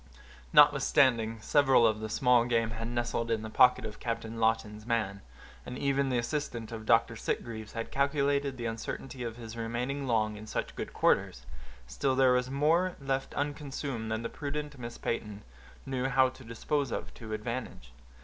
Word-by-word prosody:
Notwithstanding 115 -5 +5
several 135 -2 +4
of 110 -1 +2
the 110 0 -5
small 125 +1 +4
game 115 -2 +1
had 115 +1 -4
nestled 120 -1 -2
in 110 -1 0
the 110 - -6
pocket 125 -1 +5
of 105 -1 -7
Captain 115 -1 -4
Lawton's 110 -1 0
man, 110 -4 -1 0.4
and 125 - -7
even 140 0 +1
the 125 - +1
assistant 120 -2 -3
of 110 -1 -7
Dr. 115 -1 +4
Sitgreaves 110 -1 -4
had 115 -1 -5
calculated 140 -1 +1
the 120 - -4
uncertainty 115 +3 -5
of 115 -2 -4
his 115 -1 -8
remaining 125 +5 -3
long 110 -3 +1
in 110 +1 -10
such - - -3
good - - -5
quarters, - - +1 0.4
still 65 - -1
there 130 -1 +5
was 125 0 +1
more 165 +7 +2
left 135 -1 -2
unconsumed 140 -5 -3
than 110 +1 -2
the - - -1
prudent 150 +2 -5
Miss 120 -1 -7
Peyton 105 -3 -4 0.4
knew 130 -1 -2
how 130 0 +4
to 130 0 -14
dispose 135 +5 -2
of - - -4
to 110 -3 -9
advantage. 110 - -5
120 Hz, 170 wpm, -30 LUFS, 115-135 Hz, 0.4 s, Notwithstanding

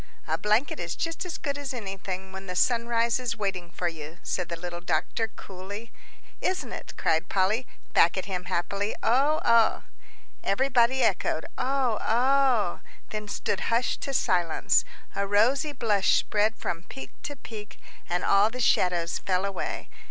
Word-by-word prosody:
"A - - +1
blanket 215 +7 +1
is 170 -1 -3
just 330 +2 -3
as 340 - -4
good 285 -1 -3
as 275 -2 -4
anything 190 -3 -5
when 190 0 -8
the 180 - -4
sunrise 235 +2 +2
is 235 -2 -2
waiting 190 -4 -2
for 175 +1 -2
you," 160 0 -6
said 180 - -2
the 170 - -2
little 175 0 -5
doctor, 180 +6 0
coolly. 205 +2 -9 0.5
"Isn't 370 - -1
it!" - - -7
cried 160 +1 +1
Polly, 205 +6 +1 0.3
back 170 +3 +5
at 185 - -2
him, 180 -2 -4
happily. 200 +4 -1
"Oh 275 +7 +3
oh!" 230 -1 +4 0.6
Everybody 255 +3 +3
echoed, - - +1
"Oh 260 -4 +1
oh!" 250 -4 +3 0.3
then 210 -1 -4
stood 205 -1 -2
hushed 230 +2 +1
to 275 - -3
silence. 175 -7 +2 0.3
A 200 0 0
rosy 250 +9 +3
blush 220 -7 +3
spread 215 +1 +1
from 165 -5 -3
peak 135 -6 -9
to 290 - -5
peak, 215 -5 -9 0.3
and 175 0 0
all 200 +2 +5
the 250 +2 -7
shadows 175 -6 +2
fell 185 0 0
away. 195 -2 -3
210 Hz, 160 wpm, -27 LUFS, 185-245 Hz, 0.6 s, back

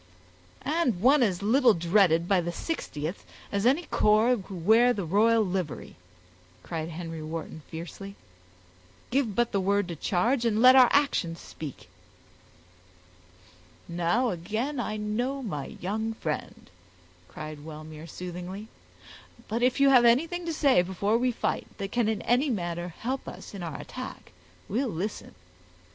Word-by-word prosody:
"And 285 - +1
one 265 +7 +5
as 200 -5 +1
little 240 +2 +5
dreaded 170 -1 +3
by 190 -2 +3
the 175 - -3
60th, 170 - -4 0.3
as 200 +3 +1
any 285 +7 +3
corps 220 -2 +3
who 195 -1 -9
wear 225 +8 +4
the 200 -6 -3
royal 220 +5 +3
livery," 180 -5 -4 0.7
cried 160 -1 -4
Henry 165 -1 -6
Wharton, 160 0 -6
fiercely. 180 +4 -8 1.0
"Give 245 -6 +1
but 240 0 +1
the 200 - +1
word 200 0 +1
to 170 - -4
charge, 230 - +1
and 220 -2 +1
let 255 +2 +8
our 255 -2 +8
actions 195 - +1
speak." 150 -5 -9 2.0
"Now 175 +9 +1
again 220 - -3
I 215 -2 -2
know 240 +6 -2
my 150 - -4
young 220 +4 -3
friend," 150 - -5 0.6
cried 155 +3 -8
Wellmere, 155 0 -9
soothingly; 180 +5 -7 0.8
"but 230 +3 -2
if 250 +1 +2
you 275 0 +6
have 250 -2 +7
anything 330 +9 +2
to 330 - -1
say 275 - +4
before 200 +5 0
we 250 0 +2
fight, - - -2
that 195 -1 -5
can 235 -3 +1
in 220 - -2
any 255 +5 +2
manner 175 -6 -2
help 260 +3 -3
us - - -9
in 200 - -7
our 165 -5 -5
attack, - - -8 0.4
we'll 245 +6 -1
listen. 200 +3 -5
205 Hz, 145 wpm, -27 LUFS, 175-245 Hz, 2.0 s, let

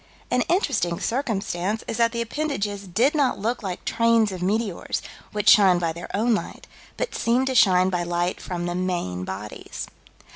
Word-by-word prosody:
An 250 - +3
interesting 245 - +1
circumstance 215 -5 -2
is 225 - -3
that 230 -1 +3
the 235 0 -1
appendages 215 -7 -3
did 235 - +2
not 285 -4 +2
look 230 +5 -2
like 185 -4 -5
trains 230 -2 +3
of 185 -2 -6
meteors, 205 0 -1 0.3
which 210 0 -3
shine 190 -4 +7
by 165 -2 -1
their 170 +2 -8
own 230 +4 +2
light, 215 - -4 0.3
but - - -2
"seemed 245 +3 +1
to 265 - -1
shine 185 -5 +5
by 180 -1 0
light 175 +1 -1
from 175 -1 -4
the 175 - -2
main 175 - -2
bodies." 100 +3 -6
205 Hz, 175 wpm, -24 LUFS, 175-235 Hz, 0.3 s, shine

